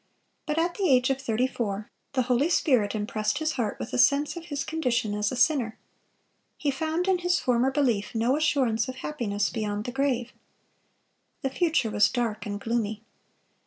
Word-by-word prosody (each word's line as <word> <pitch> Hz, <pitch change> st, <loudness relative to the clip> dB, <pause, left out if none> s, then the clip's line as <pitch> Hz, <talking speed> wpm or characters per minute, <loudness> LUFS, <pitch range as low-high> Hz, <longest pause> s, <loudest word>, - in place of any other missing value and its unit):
But 300 Hz, +1 st, -1 dB
at 340 Hz, +1 st, +1 dB
the 385 Hz, -3 st, 0 dB
age 255 Hz, 0 st, +4 dB
of 265 Hz, 0 st, -2 dB
thirty 240 Hz, -1 st, +1 dB
four, 215 Hz, -5 st, -3 dB, 0.2 s
the 255 Hz, -, +2 dB
Holy 250 Hz, +5 st, +2 dB
Spirit 250 Hz, -12 st, +2 dB
impressed 210 Hz, 0 st, -1 dB
his 315 Hz, 0 st, 0 dB
heart 225 Hz, -5 st, -2 dB
with -, -, -6 dB
a -, -, 0 dB
sense 280 Hz, +5 st, +3 dB
of 340 Hz, -1 st, -7 dB
his 285 Hz, -4 st, -3 dB
condition 250 Hz, -9 st, -1 dB
as 210 Hz, 0 st, 0 dB
a -, -, -3 dB
sinner. 250 Hz, -5 st, +2 dB, 0.8 s
He 290 Hz, -, 0 dB
found 320 Hz, +6 st, -1 dB
in 375 Hz, -2 st, +3 dB
his 355 Hz, 0 st, +1 dB
former 250 Hz, +1 st, +2 dB
belief 250 Hz, -7 st, 0 dB
no 235 Hz, +4 st, +2 dB
assurance 260 Hz, -7 st, +1 dB
of 255 Hz, -, -5 dB
happiness 225 Hz, -9 st, -2 dB
beyond 210 Hz, -2 st, -2 dB
the 245 Hz, -, -3 dB
grave. 260 Hz, -3 st, -1 dB, 1.1 s
The 270 Hz, -, 0 dB
future 310 Hz, -7 st, +1 dB
was 205 Hz, 0 st, +4 dB
dark 230 Hz, -4 st, -2 dB
and 205 Hz, 0 st, -4 dB
gloomy. 220 Hz, -1 st, -2 dB
250 Hz, 180 wpm, -27 LUFS, 220-290 Hz, 1.1 s, age